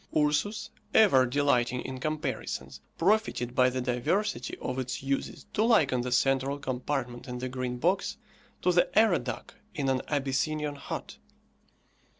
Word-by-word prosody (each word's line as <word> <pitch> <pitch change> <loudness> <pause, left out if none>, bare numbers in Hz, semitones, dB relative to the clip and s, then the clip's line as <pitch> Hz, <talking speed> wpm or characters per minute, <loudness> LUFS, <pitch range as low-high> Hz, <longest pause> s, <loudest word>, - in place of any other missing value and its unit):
Ursus, 150 +8 +1 0.2
ever 135 - +6
delighting 125 -2 +2
in 130 -1 -6
comparisons, 150 -4 -3 0.2
profited 190 - +1
by 125 0 +4
the 130 0 -2
diversity 125 - -1
of 130 +1 -3
its 130 0 -4
uses 135 0 -2
to 215 - +2
liken 155 - +4
the 125 +1 -3
central 135 +2 +2
compartment 130 -2 -3
in 125 -1 -5
the 130 +1 -3
Green 125 -1 -3
Box 180 +9 0 0.5
to 180 - +4
the 175 0 +3
arradach 215 -5 +2 0.2
in 140 -3 0
an 130 -1 +1
Abyssinian 145 +2 0
hut. 140 - -6
135 Hz, 140 wpm, -29 LUFS, 125-155 Hz, 0.5 s, ever